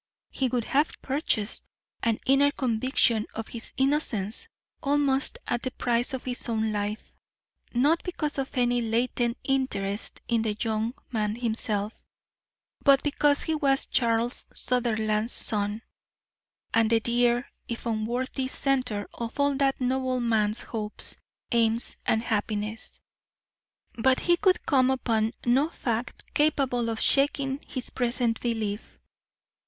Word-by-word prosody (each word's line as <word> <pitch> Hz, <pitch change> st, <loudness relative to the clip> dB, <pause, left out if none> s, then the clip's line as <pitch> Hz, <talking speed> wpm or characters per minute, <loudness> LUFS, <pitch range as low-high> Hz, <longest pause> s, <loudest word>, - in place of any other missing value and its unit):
He 265 Hz, -, 0 dB
would 245 Hz, -1 st, -1 dB
have 290 Hz, +7 st, 0 dB
purchased 260 Hz, -6 st, 0 dB, 0.4 s
an 230 Hz, -2 st, +1 dB
inner 275 Hz, +2 st, +5 dB
conviction 240 Hz, -3 st, +2 dB
of 225 Hz, 0 st, -5 dB
his 235 Hz, -1 st, -7 dB
innocence 265 Hz, -, +1 dB, 0.3 s
almost 280 Hz, -1 st, +1 dB
at 240 Hz, -1 st, -1 dB
the 255 Hz, -, -2 dB
price 240 Hz, -1 st, 0 dB
of 260 Hz, -, -7 dB
his 250 Hz, -1 st, -2 dB
own 220 Hz, -1 st, 0 dB
life, 210 Hz, +1 st, -3 dB, 0.6 s
not 295 Hz, +7 st, +3 dB
because 300 Hz, -6 st, -3 dB
of 265 Hz, -1 st, -4 dB
any 245 Hz, 0 st, +2 dB
latent 235 Hz, +1 st, 0 dB
interest 225 Hz, -7 st, -1 dB
in 230 Hz, -2 st, +2 dB
the 215 Hz, -2 st, -1 dB
young 225 Hz, +2 st, -1 dB, 0.2 s
man 215 Hz, -2 st, 0 dB
himself, 220 Hz, -3 st, -1 dB, 0.8 s
but 275 Hz, -2 st, +6 dB
because 290 Hz, 0 st, +2 dB
he 320 Hz, -, -1 dB
was 275 Hz, -3 st, +2 dB
Charles 235 Hz, 0 st, 0 dB
Sutherland's 220 Hz, -2 st, 0 dB
son, 210 Hz, +1 st, 0 dB, 0.9 s
and 225 Hz, -1 st, +4 dB
the 230 Hz, 0 st, +4 dB
dear, 240 Hz, +1 st, +2 dB, 0.2 s
if 235 Hz, 0 st, -5 dB
unworthy, 240 Hz, +4 st, -1 dB
centre 255 Hz, -7 st, 0 dB
of 235 Hz, +4 st, -6 dB
all 285 Hz, 0 st, +3 dB
that 275 Hz, -1 st, +1 dB
noble 255 Hz, 0 st, 0 dB
man's 220 Hz, -2 st, +1 dB
hopes, 215 Hz, -2 st, -3 dB, 0.4 s
aims, 230 Hz, 0 st, +2 dB
and 220 Hz, 0 st, +2 dB
happiness. 215 Hz, -1 st, -3 dB, 1.0 s
But 260 Hz, +3 st, +4 dB
he 345 Hz, -, +4 dB
could 370 Hz, 0 st, +2 dB
come 260 Hz, -3 st, +4 dB
upon 225 Hz, -3 st, +1 dB
no 265 Hz, +6 st, +3 dB
fact 235 Hz, -6 st, -4 dB
capable 270 Hz, -6 st, +2 dB
of 225 Hz, -1 st, -2 dB
shaking 275 Hz, -1 st, +2 dB
his 255 Hz, -2 st, -2 dB
present 240 Hz, -2 st, 0 dB
belief. 220 Hz, -3 st, -3 dB
240 Hz, 130 wpm, -27 LUFS, 220-265 Hz, 1.0 s, but